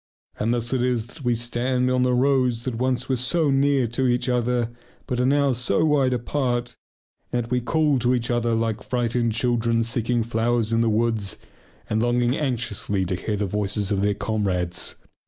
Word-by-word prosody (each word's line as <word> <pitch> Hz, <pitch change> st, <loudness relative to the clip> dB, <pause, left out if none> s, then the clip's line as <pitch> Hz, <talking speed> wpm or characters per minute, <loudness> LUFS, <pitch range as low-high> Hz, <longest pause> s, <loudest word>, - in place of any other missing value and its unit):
And 110 Hz, +2 st, +1 dB
thus 120 Hz, +1 st, -1 dB
it 130 Hz, -, +1 dB
is 125 Hz, -3 st, 0 dB
that 140 Hz, +4 st, -14 dB
we 120 Hz, -1 st, +2 dB
stand 125 Hz, +2 st, 0 dB
on 130 Hz, 0 st, +2 dB
the 125 Hz, 0 st, +2 dB
roads 125 Hz, -3 st, +2 dB
that 130 Hz, -, -3 dB
once 125 Hz, +2 st, -1 dB
were 130 Hz, -, +1 dB
so 145 Hz, +5 st, +1 dB
near 135 Hz, -2 st, +2 dB
each 125 Hz, 0 st, +1 dB
other 120 Hz, -1 st, 0 dB, 0.3 s
but 125 Hz, -3 st, -2 dB
are 125 Hz, -, +2 dB
now 140 Hz, -1 st, +3 dB
so 120 Hz, 0 st, +1 dB
wide 140 Hz, -4 st, +3 dB
apart 120 Hz, -1 st, -2 dB, 0.6 s
and 120 Hz, -1 st, 0 dB
that 115 Hz, -, -12 dB
we 125 Hz, 0 st, +1 dB
call 150 Hz, +1 st, +2 dB
to 125 Hz, +1 st, +2 dB
each 120 Hz, 0 st, -1 dB
other 120 Hz, -1 st, +1 dB
like 115 Hz, -1 st, -1 dB
frightened 120 Hz, -2 st, 0 dB
children 115 Hz, 0 st, +1 dB
seeking 115 Hz, 0 st, 0 dB
flowers 115 Hz, 0 st, 0 dB
in 115 Hz, -, +3 dB
the 115 Hz, -, +2 dB
woods 110 Hz, -3 st, 0 dB, 0.5 s
and 110 Hz, +1 st, 0 dB
longing 120 Hz, +1 st, +2 dB
anxiously 115 Hz, -8 st, -1 dB
to 90 Hz, -, -2 dB
hear 105 Hz, +3 st, -3 dB
the 105 Hz, -, -1 dB
voices 100 Hz, +1 st, -2 dB
of 100 Hz, -1 st, +1 dB
their 100 Hz, 0 st, +1 dB
comrades. 95 Hz, -5 st, -2 dB
120 Hz, 190 wpm, -23 LUFS, 115-125 Hz, 0.6 s, now